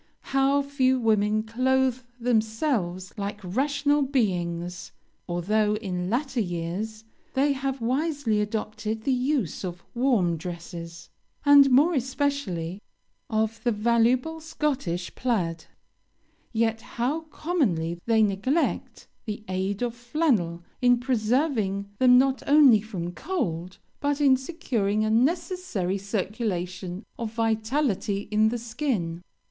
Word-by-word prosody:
How 275 Hz, +1 st, +3 dB
few 260 Hz, -2 st, +2 dB
women 215 Hz, -2 st, +2 dB
clothe 255 Hz, +2 st, +1 dB, 0.2 s
themselves 220 Hz, -, 0 dB
like 200 Hz, +1 st, -3 dB
rational 285 Hz, +8 st, +1 dB
beings! 180 Hz, -9 st, -1 dB, 0.4 s
Although, 210 Hz, +5 st, +1 dB
in 185 Hz, -4 st, -3 dB
latter 260 Hz, +2 st, -1 dB
years, 190 Hz, +4 st, -3 dB, 0.3 s
they 280 Hz, +2 st, +3 dB
have 270 Hz, -1 st, -3 dB
wisely 260 Hz, -3 st, 0 dB
adopted 215 Hz, +1 st, -3 dB
the 270 Hz, -, +1 dB
use 255 Hz, -, -1 dB
of 175 Hz, -2 st, -5 dB
warm 235 Hz, -10 st, +2 dB
dresses, 170 Hz, 0 st, -8 dB, 0.4 s
and, 285 Hz, -1 st, +8 dB
more 290 Hz, +7 st, +5 dB
especially, 255 Hz, -, -2 dB, 0.5 s
of 220 Hz, 0 st, -1 dB
the 240 Hz, -, +2 dB
valuable 235 Hz, +8 st, +2 dB
Scottish 275 Hz, -, -2 dB
plaid, 175 Hz, -10 st, -1 dB, 0.9 s
yet 225 Hz, -1 st, 0 dB
how 250 Hz, +6 st, -2 dB
commonly 175 Hz, -, -1 dB
they 225 Hz, -1 st, +4 dB
neglect 215 Hz, +11 st, -1 dB, 0.2 s
the 215 Hz, -1 st, -5 dB
aid 190 Hz, +4 st, -2 dB
of 240 Hz, -1 st, -1 dB
flannel 240 Hz, -, 0 dB, 0.2 s
in 245 Hz, -1 st, +5 dB
preserving 225 Hz, -5 st, 0 dB
them 250 Hz, -1 st, +7 dB
not 265 Hz, +1 st, +3 dB
only 280 Hz, -7 st, +7 dB
from 185 Hz, -5 st, -5 dB
cold, 180 Hz, -, -3 dB, 0.2 s
but 285 Hz, 0 st, 0 dB
in 275 Hz, -3 st, +5 dB
securing 240 Hz, -, -1 dB
a 215 Hz, -, 0 dB
necessary 250 Hz, -, 0 dB
circulation 190 Hz, -2 st, -3 dB
of 230 Hz, -2 st, -4 dB
vitality 220 Hz, -2 st, 0 dB
in 215 Hz, +1 st, +4 dB
the 240 Hz, -, -2 dB
skin! 220 Hz, -, -2 dB
225 Hz, 115 wpm, -26 LUFS, 190-265 Hz, 0.9 s, and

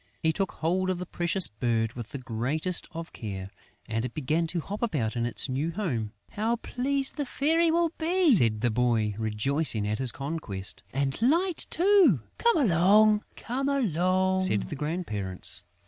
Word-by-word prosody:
He 160 Hz, 0 st, +3 dB
took 195 Hz, 0 st, -2 dB
hold 185 Hz, +4 st, 0 dB
of 185 Hz, -, 0 dB
the 180 Hz, -, -5 dB
precious 175 Hz, +1 st, 0 dB
bird 115 Hz, +1 st, -1 dB
with 120 Hz, -3 st, -7 dB
the -, -, -5 dB
greatest 130 Hz, +8 st, -2 dB
of 165 Hz, 0 st, -8 dB
care; 100 Hz, -4 st, -6 dB, 0.4 s
and 115 Hz, 0 st, -2 dB
it 125 Hz, -1 st, -5 dB
began 155 Hz, +3 st, 0 dB
to 170 Hz, +1 st, -2 dB
hop 200 Hz, +6 st, -6 dB
about 140 Hz, -, -1 dB
in 120 Hz, 0 st, 0 dB
its 120 Hz, -, -1 dB
new 140 Hz, +5 st, -1 dB
home. 135 Hz, -, -3 dB, 0.2 s
"How 225 Hz, +3 st, 0 dB
pleased 270 Hz, +4 st, -2 dB
the 290 Hz, -, -1 dB
Fairy 325 Hz, +6 st, +2 dB
will 335 Hz, 0 st, +2 dB
be!" 345 Hz, 0 st, +3 dB
said 115 Hz, -, +5 dB
the 120 Hz, -, +1 dB
boy, 115 Hz, -2 st, +1 dB
rejoicing 110 Hz, +1 st, +1 dB
at 105 Hz, +2 st, -2 dB
his 130 Hz, -3 st, +2 dB
conquest. 135 Hz, -9 st, -5 dB
"And 135 Hz, -, -2 dB
Light 335 Hz, +8 st, +1 dB
too!" 350 Hz, -, +4 dB, 0.2 s
"Come 470 Hz, -5 st, +3 dB
along," 210 Hz, -, +4 dB, 1.2 s
said 105 Hz, -, +4 dB
the -, -, -6 dB
grandparents. 105 Hz, -, -2 dB
160 Hz, 165 wpm, -27 LUFS, -, 1.2 s, said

